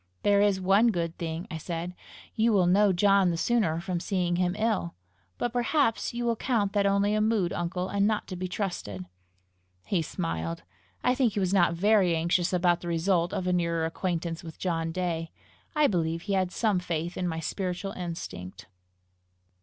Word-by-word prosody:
"There 200 Hz, 0 st, +4 dB
is 205 Hz, -2 st, +3 dB
one 195 Hz, +5 st, +4 dB
good 170 Hz, -6 st, -1 dB
thing," 165 Hz, +1 st, -4 dB
I 160 Hz, -, -3 dB
said: 170 Hz, +2 st, -4 dB, 0.4 s
"you 225 Hz, +1 st, +2 dB
will 190 Hz, -3 st, +4 dB
know 195 Hz, +3 st, +4 dB
John 195 Hz, 0 st, +4 dB
the 170 Hz, -, -1 dB
sooner 180 Hz, -6 st, +1 dB
from 180 Hz, 0 st, -3 dB
seeing 175 Hz, -2 st, -1 dB
him 180 Hz, 0 st, +1 dB
ill! 215 Hz, -6 st, 0 dB, 0.4 s
But 240 Hz, -, -2 dB
perhaps 245 Hz, 0 st, +1 dB
you 240 Hz, 0 st, -3 dB
will 235 Hz, -1 st, +2 dB
count 215 Hz, -4 st, 0 dB
that 200 Hz, -1 st, +2 dB
only 200 Hz, +1 st, +2 dB
a 215 Hz, -, +2 dB
mood, 215 Hz, -5 st, +1 dB
uncle, 180 Hz, +1 st, -2 dB
and 200 Hz, +1 st, +1 dB
not 215 Hz, -1 st, 0 dB
to 185 Hz, -, -4 dB
be 185 Hz, +1 st, -3 dB
trusted!" 175 Hz, -, -4 dB, 0.8 s
He 185 Hz, -4 st, +1 dB
smiled. 85 Hz, -, -4 dB, 0.4 s
I 250 Hz, -, +3 dB
think 250 Hz, -5 st, +1 dB
he 205 Hz, -, -1 dB
was 185 Hz, -1 st, 0 dB
not 175 Hz, -3 st, +3 dB
very 195 Hz, -1 st, +3 dB
anxious 170 Hz, +2 st, +1 dB
about 175 Hz, -1 st, +2 dB
the 175 Hz, -, -7 dB
result 170 Hz, +1 st, +1 dB
of 185 Hz, -, -2 dB
a 180 Hz, -, +1 dB
nearer 170 Hz, -2 st, 0 dB
acquaintance 170 Hz, 0 st, -3 dB
with 160 Hz, -2 st, -9 dB
John 165 Hz, -3 st, -1 dB
Day. 165 Hz, -2 st, -2 dB, 0.5 s
I 300 Hz, 0 st, +4 dB
believe 165 Hz, -, 0 dB
he 200 Hz, -, -2 dB
had 185 Hz, -2 st, +1 dB
some 210 Hz, -4 st, +1 dB
faith 170 Hz, -1 st, -3 dB
in 180 Hz, -, -2 dB
my 165 Hz, -1 st, -2 dB
spiritual 185 Hz, +3 st, -3 dB
instinct. 105 Hz, -, -7 dB
180 Hz, 185 wpm, -28 LUFS, 170-200 Hz, 0.8 s, There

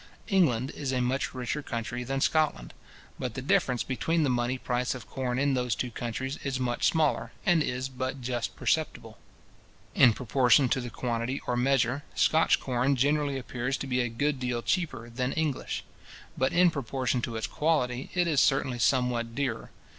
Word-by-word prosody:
England 140 Hz, -, +2 dB
is 140 Hz, -3 st, -4 dB
a 130 Hz, -, 0 dB
much 125 Hz, +2 st, 0 dB
richer 130 Hz, +4 st, -2 dB
country 120 Hz, -1 st, -4 dB
than 135 Hz, +2 st, -2 dB
Scotland, 150 Hz, -, +1 dB, 0.5 s
but 125 Hz, -3 st, -4 dB
the -, -, -3 dB
difference 125 Hz, -2 st, +2 dB
between 160 Hz, +5 st, 0 dB
the 140 Hz, -, +2 dB
money 120 Hz, +1 st, 0 dB
price 125 Hz, +1 st, -1 dB
of 125 Hz, -5 st, -9 dB
corn 125 Hz, -2 st, -2 dB
in 140 Hz, +1 st, +2 dB
those 125 Hz, -4 st, 0 dB
two 125 Hz, -, -3 dB
countries 125 Hz, +5 st, -4 dB
is 135 Hz, -2 st, -2 dB
much 120 Hz, -2 st, +1 dB
smaller, 155 Hz, -3 st, +1 dB
and 175 Hz, -5 st, +4 dB
is 130 Hz, -2 st, -2 dB
but 130 Hz, +1 st, -4 dB
just 120 Hz, -2 st, -3 dB
perceptible. -, -, -1 dB, 0.7 s
In 125 Hz, -4 st, +6 dB
proportion 125 Hz, +3 st, +3 dB
to 130 Hz, +1 st, +1 dB
the 120 Hz, -, -5 dB
quantity 120 Hz, +3 st, -2 dB
or 125 Hz, -, 0 dB
measure, 130 Hz, +1 st, +2 dB
Scotch 160 Hz, +1 st, +4 dB
corn 130 Hz, +2 st, +1 dB
generally 145 Hz, +1 st, +1 dB
appears 125 Hz, +1 st, -3 dB
to -, -, -5 dB
be 125 Hz, -1 st, 0 dB
a 120 Hz, -, -1 dB
good 140 Hz, +4 st, -1 dB
deal 125 Hz, -2 st, -2 dB
cheaper 140 Hz, -11 st, -1 dB
than 125 Hz, +2 st, -2 dB
English; 155 Hz, -4 st, -2 dB, 0.5 s
but, 130 Hz, -, +1 dB
in 175 Hz, 0 st, +5 dB
proportion 130 Hz, -3 st, -1 dB
to 115 Hz, 0 st, -4 dB
its 110 Hz, -, -2 dB
quality, 135 Hz, -5 st, 0 dB
it 180 Hz, 0 st, +3 dB
is 155 Hz, -4 st, +3 dB
certainly 130 Hz, -2 st, +2 dB
somewhat 120 Hz, 0 st, +1 dB
dearer. 130 Hz, -6 st, -2 dB
130 Hz, 175 wpm, -28 LUFS, 120-140 Hz, 0.7 s, In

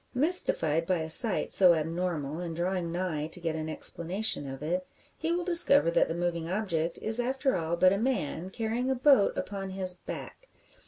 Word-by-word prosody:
Mystified 170 Hz, -, +2 dB
by 185 Hz, -, 0 dB
a 160 Hz, -, -6 dB
sight 215 Hz, +4 st, +4 dB
so 180 Hz, -3 st, +6 dB
abnormal, 160 Hz, -2 st, -4 dB
and 170 Hz, -2 st, -6 dB
drawing 175 Hz, 0 st, -3 dB
nigh 170 Hz, -4 st, -4 dB
to 165 Hz, -, -3 dB
get 165 Hz, -2 st, -4 dB
an 160 Hz, 0 st, -6 dB
explanation 170 Hz, +1 st, +1 dB
of 135 Hz, +1 st, -9 dB
it, 180 Hz, +4 st, -4 dB, 0.3 s
he 325 Hz, +1 st, -4 dB
will 350 Hz, +1 st, -2 dB
discover 335 Hz, -, +6 dB
that -, -, +1 dB
the 165 Hz, -, -5 dB
moving 170 Hz, -1 st, -4 dB
object 175 Hz, -4 st, -3 dB
is 220 Hz, +2 st, +1 dB
after 265 Hz, +2 st, -2 dB
all 165 Hz, 0 st, -3 dB
but 185 Hz, +2 st, +3 dB
a 200 Hz, -, -2 dB
man, 190 Hz, -, -3 dB
carrying 230 Hz, +5 st, -4 dB
a 265 Hz, -, 0 dB
boat 255 Hz, -5 st, +2 dB
upon 195 Hz, -1 st, -6 dB
his 190 Hz, -1 st, -4 dB
back! -, -, -11 dB
180 Hz, 190 wpm, -27 LUFS, 165-225 Hz, 0.3 s, so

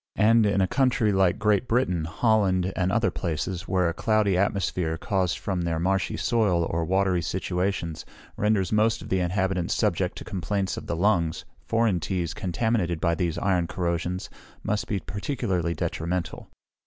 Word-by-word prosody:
And 110 Hz, 0 st, +5 dB
in 100 Hz, -1 st, +2 dB
a 95 Hz, -, +2 dB
country, 125 Hz, -3 st, +2 dB
like 95 Hz, -2 st, +3 dB
Great 105 Hz, +2 st, +2 dB
Britain, 90 Hz, -10 st, +1 dB
Holland, 95 Hz, -1 st, +1 dB
and 95 Hz, 0 st, 0 dB
other 115 Hz, +2 st, +2 dB
places, 85 Hz, +2 st, -3 dB
where 90 Hz, -2 st, +2 dB
a 85 Hz, -, -1 dB
cloudy 105 Hz, +1 st, +2 dB
atmosphere, 90 Hz, -4 st, 0 dB
caused 95 Hz, -4 st, 0 dB
from 95 Hz, -3 st, -2 dB
their 85 Hz, -1 st, -1 dB
marshy 95 Hz, +3 st, 0 dB
soil 100 Hz, -8 st, +2 dB
or 85 Hz, 0 st, 0 dB
watery 95 Hz, 0 st, +1 dB
situation, 90 Hz, 0 st, -2 dB, 0.4 s
renders 105 Hz, -3 st, +1 dB
most 110 Hz, +1 st, +2 dB
of -, -, -10 dB
the 95 Hz, -, +1 dB
inhabitants 90 Hz, 0 st, 0 dB
subject -, -, 0 dB
to -, -, -7 dB
complaints 95 Hz, +1 st, -2 dB
of -, -, -8 dB
the -, -, -1 dB
lungs, 85 Hz, -3 st, +1 dB, 0.2 s
foreign 115 Hz, -5 st, +2 dB
teas, 85 Hz, -1 st, -2 dB
contaminated 100 Hz, -3 st, -1 dB
by 85 Hz, +1 st, +1 dB
these 85 Hz, -1 st, -1 dB
iron 90 Hz, -3 st, +1 dB
corrosions, 90 Hz, +1 st, -2 dB, 0.4 s
must 105 Hz, 0 st, -1 dB
be 100 Hz, -, -1 dB
particularly 100 Hz, -, -2 dB
detrimental. 85 Hz, +1 st, -3 dB
95 Hz, 160 wpm, -26 LUFS, 85-105 Hz, 0.4 s, And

